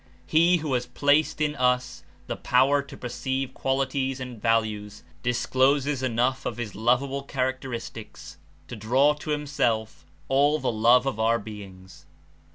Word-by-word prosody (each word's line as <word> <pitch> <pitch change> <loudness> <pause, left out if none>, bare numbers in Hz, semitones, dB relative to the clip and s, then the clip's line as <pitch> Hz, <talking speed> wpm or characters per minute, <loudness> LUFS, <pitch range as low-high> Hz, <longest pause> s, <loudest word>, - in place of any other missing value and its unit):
He, 170 - +4
who 150 -4 -3
has 125 -1 -1
placed 145 +5 +2
in 150 -1 +1
us 125 - 0 0.2
the - - -4
power 135 +3 +3
to 140 - -12
perceive 130 +2 -3
qualities 135 0 -1
and 125 -4 -8
values, 105 -2 -1 0.2
discloses 130 +3 +1
enough 130 +1 0
of - - -4
his 120 -4 -5
lovable 125 +5 +1
characteristics 130 -4 -5 0.3
to - - -7
draw 130 +7 +3
to 150 +1 -6
him 150 0 -2
self 115 -7 -1 0.2
all 145 +3 +3
the - - -1
love 120 +3 +4
of 135 -5 -2
our 115 +1 +3
beings. 100 -4 -11
130 Hz, 145 wpm, -25 LUFS, 115-140 Hz, 0.3 s, He